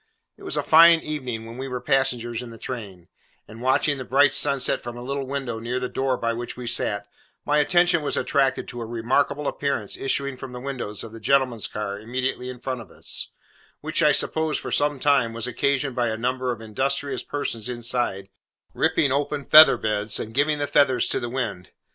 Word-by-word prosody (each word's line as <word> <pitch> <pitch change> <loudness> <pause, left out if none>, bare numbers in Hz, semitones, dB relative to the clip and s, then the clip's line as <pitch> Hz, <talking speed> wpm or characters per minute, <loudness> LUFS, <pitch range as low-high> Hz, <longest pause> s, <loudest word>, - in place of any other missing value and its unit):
It - - -22
was - - -4
a - - 0
fine 165 +1 +7
evening 130 -7 -5
when 115 +2 -9
we 135 - -4
were 125 -1 -4
passengers 120 -3 0
in 125 - -8
the 115 - -11
train: 100 -8 -7 0.4
and 110 +2 -12
watching 135 +2 +1
the - - -4
bright 135 +2 +3
sunset 140 -2 +1
from 120 0 -7
a 120 - -7
little 135 +1 -3
window 130 -4 -4
near 120 +2 -3
the 125 - -2
door 130 0 -1
by 115 -1 -1
which 120 +1 -6
we 125 - -7
sat, 105 -3 -1 0.4
my 150 0 +2
attention 175 +2 +3
was 145 - -1
attracted 135 -2 +1
to 120 -1 -7
a - - -4
remarkable 135 +5 0
appearance 140 -8 -2
issuing 140 0 -2
from 130 -1 -8
the 125 - -6
windows 125 -6 -5
of 115 - -9
the 115 - -10
gentleman's 125 -1 +1
car 100 -1 -5
immediately 125 +3 -3
in 125 -1 -8
front 130 -1 -4
of - - -13
us, - - -4 0.5
which 155 +2 -2
I 150 -2 +5
supposed 160 +1 0
for - - -7
some 145 -1 +1
time 135 -5 +2
was 115 0 -4
occasioned 135 +2 -1
by 120 -1 +1
a 110 -1 -2
number 125 +2 -1
of 115 -2 -6
industrious 135 +6 -2
persons 120 -5 -4
inside, 120 -5 -2 0.4
ripping 140 - +2
open 145 +1 -1
feather 155 +1 +9
beds, 105 -1 0
and 110 - -6
giving 145 +4 +2
the 145 - -1
feathers 130 -4 +3
to - - +1
the 120 - -4
wind. 115 -8 -4
125 Hz, 205 wpm, -24 LUFS, 115-140 Hz, 0.5 s, feather